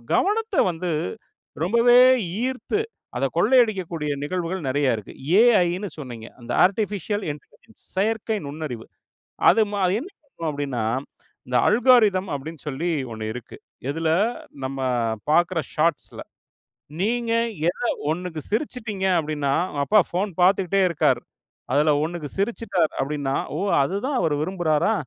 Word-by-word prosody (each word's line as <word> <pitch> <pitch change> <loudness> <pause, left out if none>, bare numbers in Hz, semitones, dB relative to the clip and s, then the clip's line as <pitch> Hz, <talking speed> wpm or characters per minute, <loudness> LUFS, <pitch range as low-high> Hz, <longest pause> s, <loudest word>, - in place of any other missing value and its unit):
கவனத்தை 425 0 +1
வந்து 175 +2 -4 0.7
ரொம்பவே 235 +6 +5 0.5
ஈர்த்து 260 +11 -2 0.4
அத 135 - +1
கொள்ளையடிக்கக்கூடிய 190 - +2
நிகழ்வுகள் 175 -1 -3
நிறைய 135 -3 +2
இருக்கு. 105 - -9 0.3
AIன்னு 200 -5 +3
சொன்னீங்க. 120 -5 -8
அந்த 120 - -7
ஆர்டிபிஷியல் 205 0 -1
இன்இன்டெலிஜென்ஸ் 150 +9 -11
செயற்கை 220 +2 0
நுண்ணறிவு. 140 -6 -6 0.6
அது 225 - +5 0.4
என்ன 340 +9 -8
பண்ணும் 170 - -5
அப்படின்னா, 140 -5 -3 0.6
இந்த 125 0 +1
அல்கோரித்ம் 215 -5 +4
அப்படின்னு 155 +3 -7
சொல்லி 150 +5 -2 0.2
ஒண்ணு 110 -1 -5
இருக்கு. 125 -1 -9 0.3
இதில 160 +2 -1 0.6
நம்ம 135 0 -4 0.5
பாக்கற 175 +1 +3 0.2
ஷாட்ஸ்ல 160 -1 0 0.8
நீங்க 230 +3 0 0.4
எதை 240 +6 -2 0.2
ஒண்ணுக்கு 165 -2 -4
சிரிச்சுட்டீங்க 220 -4 -2
அப்படின்னா, 150 -3 -1 0.2
உங்க 145 - -2
அப்பா 210 0 +5
போன் 190 +3 -1
பார்த்துட்டே 195 +1 +3
இருக்காரு. 170 - +2 0.5
அதில 150 +1 +4
ஒண்ணுக்கு 160 -3 -4
சிரிச்சுட்டாரு 200 -5 0
அப்படின்னா, 140 -1 -2 0.2
"ஓ! - - -2 0.2
அதுதான் 200 - -1
அவர் 155 -3 +1
விரும்புறாரா?" 175 +2 +1
175 Hz, 115 wpm, -23 LUFS, 150-215 Hz, 0.8 s, ரொம்பவே